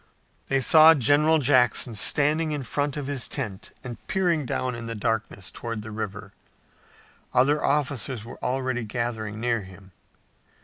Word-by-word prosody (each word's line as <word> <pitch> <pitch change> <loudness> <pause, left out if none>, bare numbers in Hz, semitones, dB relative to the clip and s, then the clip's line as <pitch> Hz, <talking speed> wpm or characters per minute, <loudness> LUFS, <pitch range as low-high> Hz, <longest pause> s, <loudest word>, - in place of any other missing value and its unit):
They 135 0 +1
saw 160 +3 +7
General 145 +4 +3
Jackson 125 -4 +3
standing 150 +8 +2
in 145 -2 -4
front 145 +3 -2
of 145 - -4
his 135 -5 -3
tent 105 -9 -6
and 125 -2 -7
peering 170 -7 0
down 130 +1 -2
in 115 -1 -7
the 115 - -5
darkness 110 -3 -3
toward 115 -2 -6
the 110 - -9
river. 105 -1 -6 1.0
Other 145 +4 +3
officers 130 -5 -1
were - - -11
already 130 -1 -2
gathering 110 -2 -4
near 115 -1 0
him. 95 0 -14
125 Hz, 145 wpm, -25 LUFS, 110-145 Hz, 1.0 s, saw